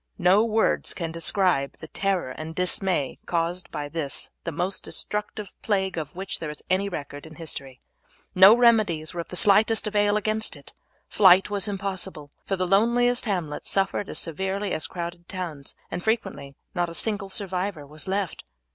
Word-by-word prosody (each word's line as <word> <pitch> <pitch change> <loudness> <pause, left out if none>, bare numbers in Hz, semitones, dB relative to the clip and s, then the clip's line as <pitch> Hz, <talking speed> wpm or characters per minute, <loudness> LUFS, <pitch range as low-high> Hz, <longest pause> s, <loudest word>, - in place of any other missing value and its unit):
No 190 +3 +5
words 225 -1 +1
can 165 -3 -4
describe 165 -4 +1
the 160 - -10
terror 190 -6 -1
and 155 +4 -7
dismay 180 -5 0
caused 170 +1 -1
by 145 -1 -4
this 145 -3 -3
the 170 - -2
most 180 +5 -2
destructive 210 -1 -3
plague 190 -3 0
of 160 -2 -5
which 190 +1 -4
there 160 - -4
is 150 - -9
any 195 +2 +2
record 145 -3 -7
in 160 - -13
history. 140 -5 -6 0.5
No 195 +5 +8
remedies 215 -10 +3
were 175 - -3
of - - -10
the - - -8
slightest 215 +3 +4
avail 205 0 +2
against 215 +1 +1
it; - - -13 0.3
flight 190 0 +5
was 205 +1 +1
impossible, 190 -6 -4 0.2
for 195 - 0
the 185 -1 -1
loneliest 235 +6 +3
hamlets 175 -8 -3
suffered 195 +1 0
as - - -2
severely 190 +5 -2
as 155 - 0
crowded 175 0 -7
towns, 170 -7 -5 0.2
and 175 - -4
frequently 220 -11 -2 0.2
not 175 -1 0
a 170 - -8
single 200 -2 -2
survivor 185 -4 -2
was 150 +3 -6
left. 195 -2 -2
185 Hz, 170 wpm, -25 LUFS, 165-205 Hz, 0.5 s, No